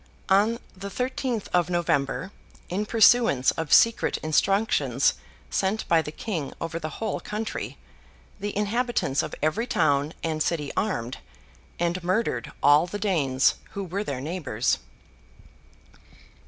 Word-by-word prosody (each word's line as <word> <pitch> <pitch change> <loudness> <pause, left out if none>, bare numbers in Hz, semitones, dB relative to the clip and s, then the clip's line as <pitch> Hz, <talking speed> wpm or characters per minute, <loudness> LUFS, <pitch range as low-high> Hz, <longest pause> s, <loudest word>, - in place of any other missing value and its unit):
On 205 +4 +4 0.2
the 200 +1 -7
thirteenth 250 -1 -2
of 180 -1 +2
November, 175 +1 0 0.4
in 200 +4 -2
pursuance 225 - +5
of 160 -2 -5
secret 230 0 +5
instructions 195 +7 +2 0.4
sent 195 +3 0
by 165 -1 +4
the 150 - -6
King 160 -5 -4
over 165 0 -3
the 155 -2 -6
whole 220 -2 -2
country, 215 +1 -5 0.6
the 205 0 -4
inhabitants 210 - 0
of - - -5
every 210 +11 +1
town 145 - +1
and 155 -1 -1
city 150 -4 -1
armed, 130 - -2 0.6
and 175 +1 -1
murdered 180 - -1
all 145 +4 +6
the 205 - -4
Danes 150 -10 +2 0.2
who 200 - -3
were 190 +3 -3
their 135 -8 -4
neighbours. 145 -7 -1
180 Hz, 125 wpm, -26 LUFS, 150-210 Hz, 0.6 s, all